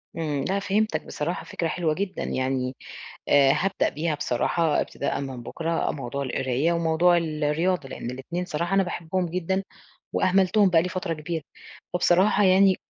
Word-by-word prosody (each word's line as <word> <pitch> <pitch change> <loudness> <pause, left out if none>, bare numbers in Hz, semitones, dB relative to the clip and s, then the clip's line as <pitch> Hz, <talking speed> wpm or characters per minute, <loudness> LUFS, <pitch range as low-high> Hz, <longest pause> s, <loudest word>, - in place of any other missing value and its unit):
إمم، 150 -4 -2
لأ 200 +1 +1
فهِمتَك، 210 +2 0
بصراحة 165 +4 -3
فكرة 170 - -2
حلوة 160 -2 0
جدًا، 195 +2 -3
يعني 130 0 -1 0.5
آآ، 140 -1 +6
هابدأ 195 +7 +1
بيها 155 +1 -2
بصراحة 150 +4 +1
ابتداءً 140 - -3
من 130 -3 -6
بكرة 165 +6 -1
موضوع 140 0 -4
القراية 130 +5 0
وموضوع 170 +1 +3
الرياضة، 155 0 0
لأن 120 - -5
الإتنين 170 +8 -4
صراحة 170 +4 -1
أنا 195 - +4
باحبهم 175 +1 -2
جدًا 185 +3 -1 0.5
وأهملتُهم 190 +1 +3
بقى 165 -2 +5
لي 180 - -2
فترة 185 -2 -3
كبيرة. 160 +1 -4 0.5
فبصراحة 190 +4 +4
يعني 190 0 +5
170 Hz, 150 wpm, -25 LUFS, 145-185 Hz, 0.5 s, آآ